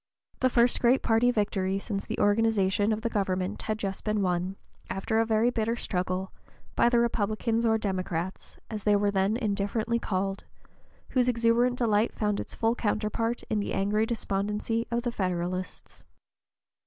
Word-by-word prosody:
The 255 - +3
first 240 0 +3
great 250 +2 +3
party 230 +2 +3
victory 195 -4 0
since 195 0 -4
the - - -3
organization 205 -1 +2
of 215 0 -1
the 230 - -1
government 190 -3 -1
had 215 -1 -2
just 195 -3 -4
been 215 -2 0
won, 180 +1 -1 0.3
after 220 +4 -1
a 225 - +2
very 225 +2 +3
bitter 230 0 0
struggle, 185 -3 -2 0.4
by 235 - +4
the 240 - +3
Republicans 230 0 +1
or 220 0 +3
Democrats, 185 -3 -3
as 215 -3 -5
they 210 -1 +4
were 205 0 +2
then 195 +3 +1
indifferently 215 +1 -1
called, 195 -2 -2 0.7
whose 250 -1 +2
exuberant 240 +1 +2
delight 220 -2 +2
found 210 -2 0
its - - -6
full 225 0 +1
counterpart 225 +1 -1
in 215 - -1
the 200 - -3
angry 210 +3 +1
despondency 210 +1 -1
of 235 0 -1
the 240 - -1
Federalists. 185 -2 -4
215 Hz, 160 wpm, -28 LUFS, 195-230 Hz, 0.7 s, by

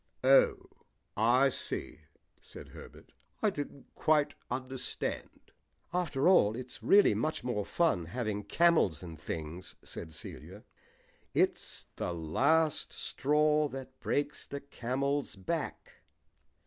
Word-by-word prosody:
"Oh, - - +6 0.6
I - - +4
see," - - -5 0.4
said - - -12
Herbert. - - -13 0.3
"I 210 - +4
didn't 145 -4 -7
quite 150 -2 +2 0.2
understand." 130 +1 -4 0.4
"After 165 -5 +1
all, 110 - +5
its 125 0 -8
really 200 - +6
much 120 +9 -1
more 120 -5 -1
fun 160 - +1
having 105 +1 -3
camels 165 - +3
and 80 -2 -9
things," 80 +3 -6
said 80 - -6
Celia. - - -9 0.7
"'It's - - 0
the 90 - -2
last 140 - +2
straw 150 +1 +2
that 130 -1 -9
breaks 145 0 -1
the 140 0 -5
camel's 140 +1 -2
back.' 95 -2 -4
135 Hz, 110 wpm, -31 LUFS, 105-155 Hz, 0.7 s, Oh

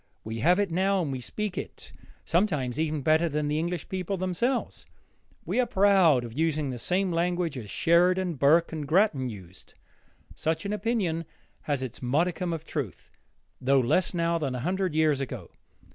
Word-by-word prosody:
We 110 +1 -5
have 175 +9 +4
it 200 -3 0
now 190 +2 +1
and 145 - -3
we 130 - -3
speak 205 - -4
it, - - -9 0.3
sometimes, 155 - 0
even 155 -3 -1
better 160 +3 +3
than 150 0 -1
the 150 +1 0
English 170 0 -3
people 190 +1 -3
themselves. 185 +8 -2 0.6
We - - -1
are 250 - +2
proud 190 -9 +4
of 115 -1 -9
using 155 -2 0
the 125 - -6
same 185 +6 0
language 175 -1 0
as 115 -6 -7
Sheridan, 180 - +3
Burke, 155 +4 +3
and 150 -3 -4
Grattan 155 - +2
used. 95 -4 -12 0.6
Such 160 +3 -2
an 200 - -2
opinion 200 -6 -1 0.4
has 140 -3 -2
its 130 -3 -7
modicum 170 +7 0
of 165 -1 -4
truth, 135 - -5 0.5
though 135 +1 +4
less 130 +9 +2
now 170 -1 0
than 135 -5 -2
a 125 - -4
hundred 185 +2 -1
years 155 -3 +2
ago. 125 -9 -6
165 Hz, 175 wpm, -27 LUFS, 140-180 Hz, 0.6 s, have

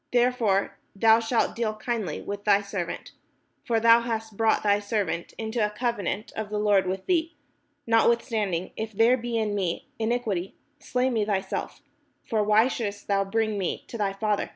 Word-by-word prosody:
Therefore 240 -5 +1 0.2
thou 220 +2 +5
shalt 230 +1 0
deal 225 -2 -1
kindly 215 -7 -3
with 205 0 -5
thy 205 -1 +4
servant; 200 -4 -5 0.5
for 230 -1 +1
thou 230 +1 +7
hast 225 -2 -4
brought 225 +1 +2
thy 205 -1 +3
servant 200 -5 -2
into 220 0 -1
a 210 - +2
covenant 210 -2 -2
of 220 -2 -4
the 210 - -2
Lord 205 -3 +3
with 190 +1 -3
thee: 335 -2 0 0.5
notwithstanding, 225 -5 +1
if 220 0 -5
there 230 +5 +5
be 240 -1 -3
in 215 -2 0
me 185 -4 -2
in 220 0 0
iquity, 205 -7 -2 0.2
slay 255 -1 0
me 225 -3 +1
thyself; 195 -2 -3 0.4
for 220 -3 0
why 215 +3 +4
shouldest 205 -5 -4
thou 200 -1 +2
bring 215 +1 -1
me 185 - -3
to - - -8
thy 200 -2 +1
father?" 210 +1 -1
215 Hz, 175 wpm, -26 LUFS, 200-230 Hz, 0.5 s, thou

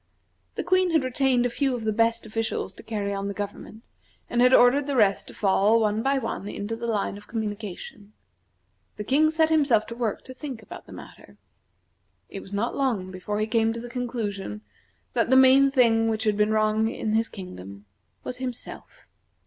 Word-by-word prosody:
The - - -3
Queen 370 +2 +2
had 320 -4 +2
retained 255 -1 +1
a - - +1
few 270 0 0
of 235 - -6
the 215 -1 0
best 230 +1 +1
officials 220 -3 -3
to - - -12
carry 205 -2 -3
on 200 0 -3
the 200 - -4
government, 210 +2 -7 0.5
and 240 - +2
had 250 0 +6
ordered 260 +3 +5
the 285 - -1
rest 205 -5 +2
to - - -11
fall, 205 +2 +3
one 215 0 +1
by 275 +3 +1
one, 205 -6 -4
into 205 +3 -4
the 235 +1 -5
line 205 -2 -2
of 205 - -18
communication. 210 -2 -6 0.8
The 210 - -4
King 295 +7 +3
set 320 0 +2
himself 275 -9 +3
to 230 - -8
work 230 -4 -2
to 260 - -10
think 255 -4 -7
about - - -11
the - - -13
matter. - - -13 0.9
It 195 - -7
was 195 - -12
not 205 +4 -2
long 225 -10 -1
before 195 +3 -4
he 215 - +1
came 225 0 +1
to 230 - -6
the 240 +1 -8
conclusion 215 - -4 0.5
that - - +1
the 260 - +5
main 265 +1 +6
thing 230 -4 +3
which 220 0 -1
had 215 -2 +1
been 210 +1 +2
wrong 215 0 +2
in 220 -1 -3
his 225 +1 +1
kingdom 100 - -10 0.4
was 250 - -4
himself. 250 -2 -8
225 Hz, 195 wpm, -25 LUFS, 210-255 Hz, 0.9 s, had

